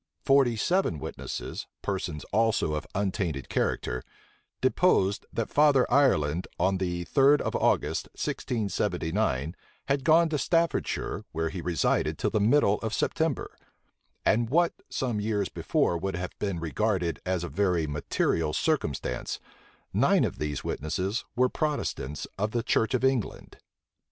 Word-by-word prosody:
Forty 135 -4 +4
seven 145 - +1
witnesses, - - -6 0.2
persons 90 -6 -3
also 110 -7 +2
of 75 - -3
untainted 95 - -2
character, 60 0 -1 0.6
deposed 95 +2 +2
that 115 - -3
Father 145 -3 +5
Ireland, 90 - +3
on 95 0 +2
the 90 -2 -2
third 140 - +4
of - - -2
August, - - +1
1679, 95 - -1 0.3
had 140 -1 +1
gone 165 +4 +5
to 150 -2 -1
Staffordshire, 165 +4 0
where 80 0 -1
he 90 - -5
resided 85 -1 0
till - - 0
the - - +1
middle 105 -1 +3
of 110 -1 -3
September; - - -1 0.7
and, 115 +2 +3
what 170 +5 +3 0.2
some 120 -5 -1
years 105 -3 0
before 85 - 0
would 95 +1 -2
have 90 -1 -4
been 100 -4 -2
regarded 90 +1 -1
as 90 -2 -1
a - - -3
very 90 -5 +1
material 75 +1 0
circumstance, 75 - -1 0.5
nine - - +4
of - - -2
these 75 -2 -3
witnesses 95 - -2
were 125 +1 +4
Protestants 140 - -2
of 105 +2 -1
the 120 -1 0
church 110 -1 +1
of - - -1
England. 130 -5 -1
100 Hz, 135 wpm, -28 LUFS, 85-125 Hz, 0.7 s, Father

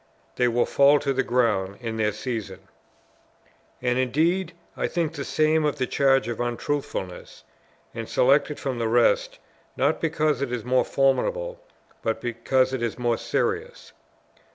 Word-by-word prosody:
They 125 - +2
will 120 0 +2
fall 140 +1 +5
to 140 -1 -1
the 135 - +1
ground 105 -7 0
in 115 -2 -4
their 105 -1 +1
season. 115 +1 -5 1.2
And 125 0 +1
indeed 165 +8 +1 0.2
I - - -1
think 170 -2 -1
the - - -5
same 155 0 +2
of 150 -1 +1
the 130 - 0
charge 135 -2 +2
of 120 -2 -4
Untruthfulness, 120 -5 -4 0.5
and - - -6
select 140 +5 +3
it 150 - -5
from 130 -3 -3
the 115 - 0
rest, 120 +1 +2 0.4
not 140 +4 +1
because 155 -4 0
it 140 -3 -2
is 120 -2 -3
more 130 +1 +2
formidable - - 0 0.4
but 110 0 -1
because 130 +3 0
it 130 - -2
is 115 -2 -2
more 120 -2 0
serious. 455 +2 -2
130 Hz, 155 wpm, -25 LUFS, 120-150 Hz, 1.2 s, fall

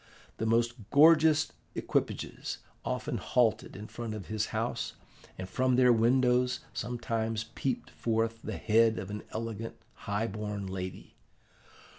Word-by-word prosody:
The 110 - -1
most 115 -1 +1
gorgeous 155 +1 +6 0.2
equipages - - -2 0.3
often - - -2
halted 120 -3 +1
in 105 - -7
front 110 +1 -5
of 105 - -8
his 110 0 0
house, - - -2 0.4
and 95 - -5
from 130 +6 +2
their 125 -1 +6
windows 125 +2 +3
sometimes 115 -1 -2
peeped 130 -3 -2
forth 115 0 -1
the - - -4
head 115 0 +4
of 95 - -5
an 105 0 -4
elegant 115 0 -4 0.2
high 100 +2 -2
born 105 -2 -4
lady. 95 -1 -6
115 Hz, 130 wpm, -30 LUFS, 105-125 Hz, 0.4 s, gorgeous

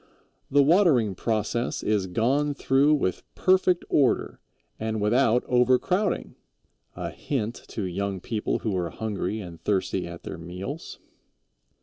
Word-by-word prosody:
"The 145 +1 +5
watering 145 - +4
process 115 +4 -1
is 105 -3 +1
gone 135 +9 +1
through 140 +3 +3
with 95 -11 -1
perfect 185 -1 +3
order 140 -4 +1 0.4
and 110 0 -2
without 120 +3 +3
overcrowding" 130 - +1 0.6
a - - -4
hint 120 -5 -3
to 110 - -4
young 95 +1 -2
people 110 +3 -2
who 105 -3 0
are 85 -2 -1
hungry 105 +2 -3
and 85 -4 -10
thirsty 95 -2 -1
at 85 0 -9
their - - -7
meals. 90 - -7
110 Hz, 125 wpm, -26 LUFS, 95-140 Hz, 0.6 s, The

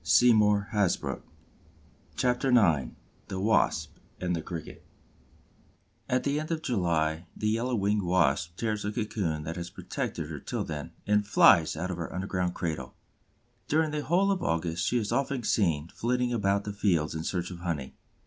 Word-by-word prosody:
CHAPTER 105 +1 +4 1.8
IX 90 - +4 0.4
THE 95 - -4
WASP 110 +3 +1 0.2
AND 90 -1 -1
THE 80 - -3
CRICKET 85 -1 -7 1.3
At 125 - +1
the 145 +1 0
end 155 - -5
of 165 -1 -2
July 85 - 0
the 105 - 0
Yellow 120 +3 0
winged 105 0 +1
Wasp 85 -2 +1
tears 110 -2 -1
the 105 - -2
cocoon 100 -9 -2
that 80 +2 -5
has 85 0 -5
protected - - -4
her - - -5
till - - -3
then 75 +1 -6
and 105 0 +2
flies 85 -6 +6
out 90 +3 -2
of 90 - -4
her 85 - -5
underground 90 -1 -2
cradle. 75 -6 -4 0.7
During 155 0 +2
the 150 0 -2
whole 190 +4 +2
of 190 -2 -1
August 85 - -1
she 125 - +2
is 105 -3 -1
often 135 -2 0
seen 85 -8 +1
flitting 125 +3 -1
about 100 -3 +1
the 105 - -5
fields 85 -7 +1
in 80 0 -4
search 90 +1 -2
of 90 - -8
honey. 80 -7 -3
95 Hz, 160 wpm, -28 LUFS, 85-115 Hz, 1.8 s, flies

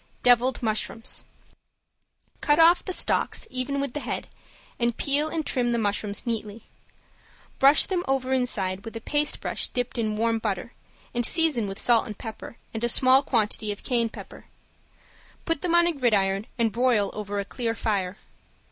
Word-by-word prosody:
~DEVILED 245 +1 +3
MUSHROOMS~ 225 +1 -2 1.2
Cut 295 0 +3
off 335 +2 +6
the 375 - -4
stalks - - +1
even 255 +2 -2
with 275 -3 -3
the 295 - -2
head 250 - -4 0.5
and 235 -1 0
peel 290 +2 +1
and 315 -1 -3
trim 245 -3 0
the - - +1
mushrooms 205 -1 -2
neatly. 220 -2 -4 1.0
Brush 275 +2 +7
them 360 -2 -2
over 265 -1 0
inside 195 -7 -1
with 225 - -9
a - - -4
paste 295 +6 0
brush - - -2
dipped 245 0 -3
in 215 -2 -1
warm 230 0 +1
butter, 210 +1 -4 0.4
and 240 - -1
season 290 -5 +3
with 195 0 -6
salt 235 -2 +3
and 210 - -7
pepper, 225 +1 -9 0.2
and 225 +1 -5
a 240 - +2
small 260 +3 +6
quantity 215 -5 0
of 205 - -8
cayenne 235 -2 0
pepper. - - -12 1.0
Put 330 -4 -1
them 345 -1 +1
on 345 0 +5
a 345 - +1
gridiron 205 -7 +1
and 230 -2 +1
broil 235 -4 +1
over 205 -1 -4
a 200 - -3
clear 230 +2 -3
fire. 200 -4 -2
235 Hz, 170 wpm, -25 LUFS, 215-270 Hz, 1.2 s, Brush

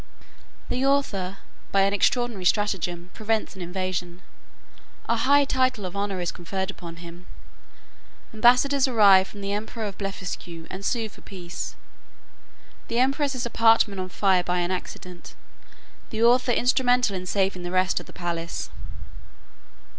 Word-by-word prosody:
The 255 - -1
author, 200 -9 0 0.3
by 195 - +4
an 195 +1 +3
extraordinary 235 -2 +1
stratagem, 180 -3 0
prevents 220 -2 -1
an 190 - -9
invasion. 180 0 -4 0.8
A 230 - +2
high 280 +5 +4
title 255 -6 +1
of 180 - -6
honour 200 -1 -2
is 175 -1 -1
conferred 190 +2 -4
upon 170 -3 -10
him. 170 +1 -12 1.1
Ambassadors 250 +5 +4
arrive 200 -6 +6
from 200 +1 -11
the 200 0 -3
emperor 220 +2 -4
of 200 -2 -6
Blefuscu, 180 -4 -5
and 190 +1 -7
sue 225 +1 0
for 215 - -17
peace. 180 -3 -7 1.1
The 230 - -2
empress's 270 0 +1
apartment 225 -4 +3
on 185 - -5
fire 190 -1 +2
by 180 0 0
an 175 +1 -1
accident; 180 -1 -7 0.7
the 220 +1 -1
author 245 +1 +4
instrumental 245 -2 +2
in 185 0 -5
saving 190 -1 0
the 175 - -4
rest 185 0 +1
of - - -12
the - - -11
palace. 170 -2 -4
200 Hz, 140 wpm, -25 LUFS, 180-235 Hz, 1.1 s, arrive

